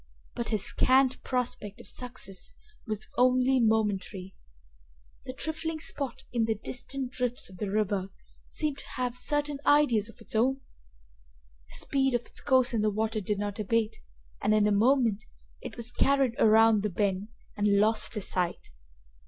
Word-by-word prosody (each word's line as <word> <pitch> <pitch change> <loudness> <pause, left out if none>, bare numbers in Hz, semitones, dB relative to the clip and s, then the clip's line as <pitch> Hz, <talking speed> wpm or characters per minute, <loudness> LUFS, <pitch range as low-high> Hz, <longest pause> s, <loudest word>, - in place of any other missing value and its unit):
But 235 - -3
his 215 -3 +1
scant 260 0 +3
prospect 245 -5 -2
of - - -12
success 235 -5 -3 0.3
was 215 -1 -4
only 255 +1 +4
momentary. 205 -4 0 0.9
The 255 - -6
trifling 315 +3 -3
spot 265 -4 -2
in 235 -2 +2
the 220 0 0
distant 255 +4 -4
drifts 250 -5 -2
of 185 - -14
the 205 - -2
river 200 -2 0 0.4
seemed 300 -3 -2
to - - -11
have 250 -1 -2
certain 290 +2 -1
ideas 245 -8 +3
of - - -15
its - - -8
own. 265 +4 +2 1.1
The - - -8
speed 270 -2 +1
of 240 - +1
its - - -5
course 255 -2 +3
in 225 - +1
the 215 - +2
water 215 +1 -1
did 205 +1 -1
not 205 +1 -4
abate 220 +1 0 0.4
and, 215 - +3
in 210 -1 +4
a 210 - +3
moment, 225 0 +3 0.4
it - - -8
was 235 +1 0
carried 275 -2 +2
around 220 -1 +5
the 210 - -1
bend, 195 +1 -1 0.3
and 205 -1 +1
lost 215 +1 +2
to 210 - 0
sight. 180 - -2
225 Hz, 160 wpm, -28 LUFS, 210-255 Hz, 1.1 s, around